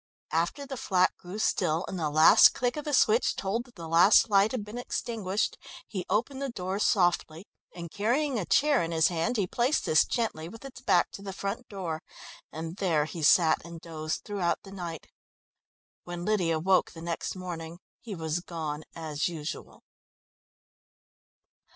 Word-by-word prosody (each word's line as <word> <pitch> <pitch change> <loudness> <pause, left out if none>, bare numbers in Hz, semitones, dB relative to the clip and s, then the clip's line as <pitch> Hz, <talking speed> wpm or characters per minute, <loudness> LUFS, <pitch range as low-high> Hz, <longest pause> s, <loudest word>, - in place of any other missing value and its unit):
After 170 - -1
the 270 -1 -6
flat 185 -5 +2
grew 185 +3 -9
still 165 -5 0
and 185 - -5
the 155 -2 0
last 155 +2 +7
click 245 -1 -1
of 300 - -5
the 300 - -2
switch 225 0 +3
told 215 +5 -2
that 245 - -20
the 165 -3 -8
last 180 +7 +5
light 200 +2 +4
had 235 -5 -3
been 215 +3 -7
extinguished, 215 -5 -2 0.3
he 185 -4 -5
opened 235 +7 -1
the 275 - -2
door 190 -3 -4
softly, 175 -4 +1 0.3
and, 170 -2 -7
carrying 245 +5 0
a 185 - -3
chair 290 -2 +3
in 165 - -2
his 160 -1 +3
hand, 180 +8 -1
he 200 - +1
placed 245 - 0
this 155 - +5
gently 195 -9 -2
with 225 +6 -12
its 250 -2 -10
back 180 -8 +2
to - - -9
the 200 -1 -6
front 200 +6 -4
door, 175 -6 -4 0.5
and 160 +3 -6
there 165 -7 +1
he 160 +1 -7
sat 160 +1 +4
and 170 -1 -9
dozed 155 -1 -5
throughout 195 -5 -1
the 195 - -12
night. 175 -4 -6 1.0
When 175 0 -6
Lydia 180 -7 +1
woke 185 +3 +2
the 165 -1 -10
next 170 +2 -3
morning 170 -3 -6 0.2
he 220 -4 -7
was 160 0 -2
gone 155 -3 -5
as 155 -3 -2
usual. 160 -1 -7
185 Hz, 175 wpm, -28 LUFS, 165-215 Hz, 1.0 s, last